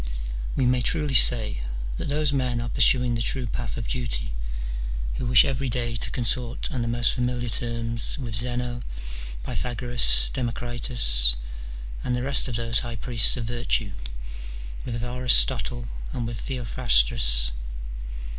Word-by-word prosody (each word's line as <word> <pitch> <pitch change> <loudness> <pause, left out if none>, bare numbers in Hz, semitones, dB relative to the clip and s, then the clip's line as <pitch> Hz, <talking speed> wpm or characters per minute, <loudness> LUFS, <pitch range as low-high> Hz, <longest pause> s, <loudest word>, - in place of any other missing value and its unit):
We 130 - +1
may 125 0 +2
truly 150 +1 +1
say 110 - +6 0.4
that - - -5
those 145 0 0
men 125 -3 -1
are 120 0 -4
pursuing 125 -1 +3
the 115 - -2
true 125 +2 -1
path 120 +1 -5
of 115 - -5
duty, 80 - -3 0.8
who 125 - -3
wish 125 0 +8
every 135 -1 -2
day 120 0 -2
to - - -3
consort 120 0 -1
on 125 - -3
the 115 - -2
most 120 0 +2
familiar 125 -1 -2
terms 115 0 -2
with 125 -5 -6
Zeno, 120 +1 -2 0.6
Pythagoras, 120 - 0
Democritus, 120 - +2 0.7
and 125 - -1
the 125 - -3
rest 135 0 +3
of 125 - -4
those 115 -1 +1
high 120 -1 -5
priests 115 +1 +2
of 120 - -4
virtue, 120 -3 -1 0.9
with 120 -1 -4
Aristotle 120 - +4 0.3
and 120 - -3
with 115 -1 -5
Theophrastus. - - +2
120 Hz, 140 wpm, -24 LUFS, 115-125 Hz, 0.9 s, wish